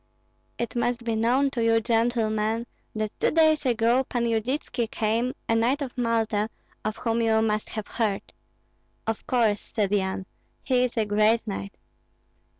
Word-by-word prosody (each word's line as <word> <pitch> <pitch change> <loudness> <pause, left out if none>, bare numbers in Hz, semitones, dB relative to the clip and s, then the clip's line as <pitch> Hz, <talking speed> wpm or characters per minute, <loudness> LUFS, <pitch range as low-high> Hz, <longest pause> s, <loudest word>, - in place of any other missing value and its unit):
"It 235 +1 -3
must 240 0 0
be 230 -1 0
known 250 +5 +2
to 240 -4 -1
you, 225 0 +4
gentlemen, 225 -1 +1 0.3
that 215 -1 -2
two - - +3
days 315 -3 +3
ago 240 +2 +3
Pan 240 -2 -2
Yudytski 230 +1 -1
came, 230 +4 0
a - - +2
knight 245 +6 +2
of 260 - -7
Malta, 225 -3 0 0.3
of 215 0 -2
whom 230 0 0
you 220 -1 +3
must 215 -1 -1
have 215 -2 -5
heard." 210 -4 -2 0.7
"Of 225 -1 -3
course," 225 -5 +2
said 205 -4 +1
Yan; 190 -2 0 0.4
"he 250 -1 +3
is 245 - -5
a 220 - +2
great 215 +2 +3
knight." 200 -1 -5
225 Hz, 155 wpm, -26 LUFS, 215-245 Hz, 0.7 s, you